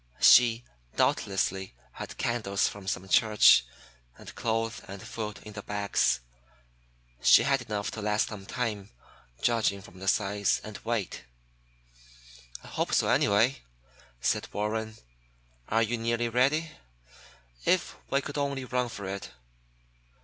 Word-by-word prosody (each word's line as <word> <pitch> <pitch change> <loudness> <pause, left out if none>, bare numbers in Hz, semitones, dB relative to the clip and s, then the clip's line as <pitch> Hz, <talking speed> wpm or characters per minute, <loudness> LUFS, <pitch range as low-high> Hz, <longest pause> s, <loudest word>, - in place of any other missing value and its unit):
She 120 -1 +6 0.3
doubtless 95 -2 +1 0.4
had - - -8
candles 110 -5 0
from 100 -2 -8
some 95 -1 -2
church, 105 - +6 0.5
and - - -11
clothes 115 +2 -2
and 100 0 -8
food 105 +1 -6
in 105 - -10
the 100 - -6
bags. 100 -9 0 1.0
She - - +7
had 135 +1 +2
enough 105 -3 -3
to 110 - -6
last 105 0 +1
some 100 -3 -9
time, 110 -6 -3 0.5
judging 115 -4 +2
from 95 -2 -14
the 95 - -7
size 100 0 +1
and 110 -1 -8
weight." 115 - -3 1.4
"I - - -12
hope - - -1
so, - - +2
anyway," 110 +6 +3 0.6
said - - -1
Warren. 110 +1 -3 0.7
"Are 115 +1 +3
you 115 +1 -1
nearly 115 +1 0
ready? 140 +7 +2 0.9
If - - +1
we 140 - +2
could 145 +1 -5
only 140 -2 -2
run 125 -1 -1
for 105 -4 -7
it!" 100 +1 -5
110 Hz, 130 wpm, -28 LUFS, 100-120 Hz, 1.4 s, She